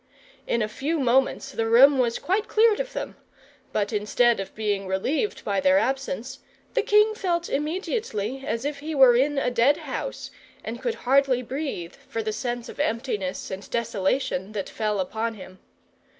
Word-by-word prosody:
In 235 - +1
a - - -1
few 290 +9 -2
moments, 265 +1 +1
the 225 -3 -1
room 265 +4 +7
was 240 -2 +1
quite 400 +5 -1
cleared 440 -1 +4
of - - -3
them; - - -5 0.5
but 205 +1 -1
instead 220 +3 +2
of 195 - -6
being 205 -3 -1
relieved 255 - -1
by 200 -1 0
their 280 0 +4
absence, 270 -1 -2 0.3
the - - +2
king 425 +1 +4
felt 345 -5 -1
immediately 285 - -2
as 230 -1 -3
if 290 -1 -3
he 310 +2 -5
were 260 -3 +7
in 280 +4 +2
a 250 -2 +1
dead 245 +4 +4
house, - - -5 0.3
and - - -6
could 475 -2 -1
hardly 265 -1 +3
breathe 255 - -4 0.2
for 225 - -3
the 215 0 -2
sense 240 0 -3
of - - -11
emptiness 230 -9 -2
and 190 +1 -7
desolation 210 -2 -1
that 200 -3 -4
fell 210 -2 -1
upon 220 +4 -2
him. 185 -2 -12
250 Hz, 170 wpm, -25 LUFS, 215-290 Hz, 0.5 s, room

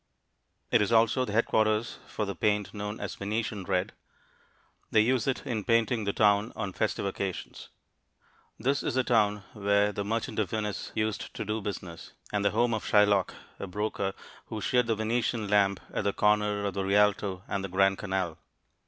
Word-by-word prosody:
It 120 - +5
is 105 - +1
also 115 +3 +4
the 105 - -5
headquarters 110 0 +1
for 105 - -3
the 100 - -3
paint 105 0 0
known 105 +1 -5
as 100 - -4
Venetian 105 -1 -3
red. 90 +2 0 1.0
They 110 - +5
use 125 +1 +1
it 135 - -1
in 110 -4 -2
painting 115 0 +2
the 100 - +1
town 105 +1 +3
on 105 -4 -4
festive - - -1
occasions. 95 -2 -4 0.9
This 135 +5 0
is - - -2
the 130 - +3
town 105 -4 +2
where 100 0 +2
the 100 - -3
Merchant 110 +2 -2
of 105 - 0
Venice 105 -2 -3
used 110 -1 -2
to - - -4
do 105 +1 -2
business, 95 -4 -6 0.2
and 105 -1 +1
the 100 - +4
home 120 +4 +1
of 110 - -2
Shylock, 105 -3 +3 0.2
a 100 - -4
broker, 100 0 -2 0.3
who 110 - -5
sheared 125 +3 +2
the 115 - +2
Venetian 110 0 -1
lamb 100 -1 +3 0.2
at - - -1
the 100 0 +1
corner 105 -1 +2
of 100 - -1
the 100 - -2
Rialto 100 -1 +2
and 100 -1 -2
the 95 - -4
Grand 95 +1 +3
Canal. 95 -5 -2
105 Hz, 180 wpm, -29 LUFS, 100-110 Hz, 1.0 s, It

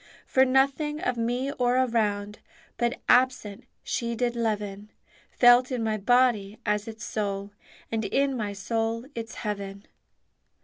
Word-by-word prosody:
For 265 0 +4
nothing 275 +3 +1
of 250 - -1
me 245 +4 -1
or 250 -2 +1
around 210 -5 0 0.4
But 240 +2 -1
absent 245 -5 +2 0.2
She 235 -1 -2
did 240 0 -1
leaven, 210 -3 -2 0.4
Felt 245 +1 +5
in 245 -3 -1
my 220 -1 0
body 220 -2 +2
as 210 0 0
its 220 -1 -7
soul, 200 -1 -3 0.4
And 225 -1 -1
in 275 +6 +1
my 210 -4 -2
soul 225 +4 -2
its 225 -2 -6
heaven. 200 -1 -5
230 Hz, 135 wpm, -26 LUFS, 210-250 Hz, 0.4 s, Felt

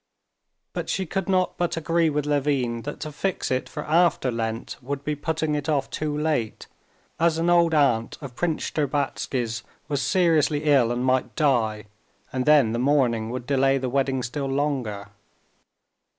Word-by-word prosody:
But - - -4
she 190 - -1
could 195 +2 -3
not 185 -1 +1
but 175 -1 0
agree 165 0 +2
with 150 -1 -1
Levin 140 -5 0
that 145 - -5
to 155 - -4
fix 190 +2 -2
it 130 0 -1
for 150 - -5
after 160 -5 +2
Lent 115 0 -3
would 140 +2 -4
be 150 - -1
putting 155 +1 -2
it 150 +1 -2
off 140 -3 0
too 150 -1 -2
late, 150 -8 -1 0.5
as 165 -1 +3
an 170 +1 +2
old 170 -2 +4
aunt 120 -6 +2
of 140 -5 -8
Prince 165 0 -1
Shtcherbatsky's 135 -5 -1 0.3
was 140 -2 -1
seriously 160 -5 +2
ill 135 -6 +4
and 120 +1 -1
might 130 0 +1
die, 115 -8 +1 0.5
and 130 +1 -2
then 145 -7 +5
the 115 - -1
mourning 125 -5 +2
would 125 0 -5
delay 135 0 +2
the 130 -1 -2
wedding 135 0 0
still 135 +3 -3
longer. 135 -8 -2
140 Hz, 165 wpm, -24 LUFS, 125-155 Hz, 0.5 s, then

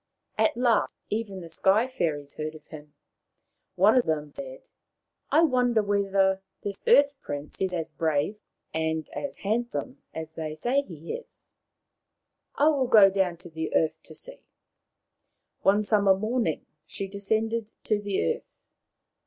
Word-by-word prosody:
At 220 +1 +2
last 240 -3 +2 0.2
even 205 -3 -3
the 170 - -8
Sky 195 +8 +3
fairies 155 - -2
heard 155 0 -5
of 155 - -14
him. 150 -1 -11 0.8
One 200 +5 +5
of 250 - +3
them 150 -2 -1
said, - - -9 0.3
" - - -54
I 325 - +5
wonder 245 -6 +3
whether 195 -1 +2 0.2
this 200 -1 -4
Earth 285 0 +6
prince 145 +1 -6
is 190 -1 +1
as 165 -4 -3
brave 155 +6 0 0.3
and 160 -1 -1 0.4
handsome 240 +5 -2
as 160 0 -6
they 155 -1 -5
say 245 - +1
he 165 - -8
is. 485 - -11 1.0
I 295 +2 +5
will 275 -4 +1
go 210 -5 +7
down 190 -3 +1
to - - -8
the 160 0 -3
earth 160 - +1
to - - -14
see.,, - - -8 1.2
One 205 +2 +4
summer 200 -2 +4
morning 215 - -1 0.2
she 195 - -4
descended 220 +3 -1
to 210 -1 +1
the 205 -2 -1
earth. - - -22
200 Hz, 145 wpm, -27 LUFS, 160-230 Hz, 1.2 s, go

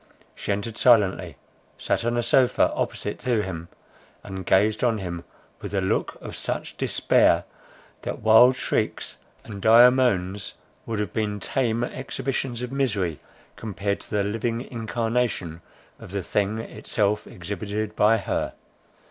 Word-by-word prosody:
She - - -4
entered 105 +3 -3
silently, 95 - +3 0.4
sat - - -1
on 120 +1 0
a 120 - +1
sofa 125 +2 +3
opposite 105 - -3
to 120 -5 +1
him, 85 -3 -6 0.6
and 95 -2 -7
gazed 105 +4 +3
on 115 -3 +2
him 85 -4 -5 0.4
with - - -5
a - - +3
look 95 - -1
of - - -8
such - - -4
despair, - - +3 0.6
that - - -4
wildest 120 +4 +6
shrieks - - -1 0.3
and 100 -2 -8
dire 120 +4 +8
moans 100 -7 0 0.3
would 115 - -2
have 105 0 -3
been 105 -2 -1
tame 120 0 0
exhibitions 130 -1 -3
of 125 - -5
misery, 100 - -1 0.4
compared 100 -2 -3
to - - -11
the 105 -2 +1
living 115 +3 -2
incarnation 115 -7 -2 0.4
of - - -11
the 100 0 -3
thing 105 +4 0
itself 105 -2 -1
exhibited 105 +4 -4
by 110 +2 +4
her. 100 - -2
110 Hz, 140 wpm, -25 LUFS, 100-120 Hz, 0.6 s, dire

